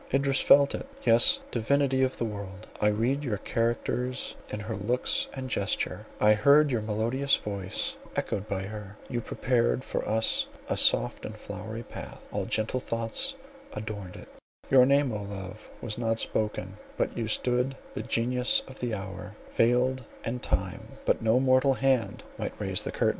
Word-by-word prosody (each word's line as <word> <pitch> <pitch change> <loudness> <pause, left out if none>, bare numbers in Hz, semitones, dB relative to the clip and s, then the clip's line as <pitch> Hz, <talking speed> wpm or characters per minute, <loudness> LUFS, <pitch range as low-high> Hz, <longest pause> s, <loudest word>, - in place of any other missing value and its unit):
Idris 135 0 +2
felt 140 0 +6
it. - - -5 0.2
Yes, 115 0 +5
divinity 130 +3 +2
of 130 0 +1
the 120 - -1
world, 100 -1 -7 0.2
I 105 - +4
read 120 +7 +1
your 115 -7 -1
characters 120 +3 -1 0.2
in 105 - -4
her 110 +1 -4
looks 120 +6 +1
and 130 -1 -4
gesture; 100 -6 -2
I 105 0 +6
heard 140 +7 +5
your 120 -3 +1
melodious 115 +6 +1
voice 100 -3 -3 0.2
echoed 100 +2 -2
by 95 -2 -2
her—you 105 +3 -6
prepared 125 +1 0
for - - -3
us 110 +1 +2 0.2
a - - 0
soft - - +4
and - - -6
flowery 110 +2 -7
path, - - -9
all - - -2
gentle 110 +4 0
thoughts 115 - 0 0.4
adorned 100 -4 -6
it—your 130 -1 +1
name, 140 -1 +3
O 105 - -3
Love, 100 +1 -8
was 110 -1 -4
not 115 -1 0
spoken, 105 -3 -1 0.2
but - - -1
you 115 -2 -2
stood 125 +4 0 0.2
the - - -3
Genius 125 +2 +1
of 130 - -11
the 120 -3 -1
Hour, 95 -1 -7 0.2
veiled, 125 +2 +2 0.2
and 120 +2 -3
time, - - -3
but - - +2
no 115 +2 +3
mortal 130 +1 +4
hand, 130 -7 +1 0.2
might - - -4
raise - - 0
the - - -3
curtain. - - +2
115 Hz, 165 wpm, -28 LUFS, 105-130 Hz, 0.4 s, felt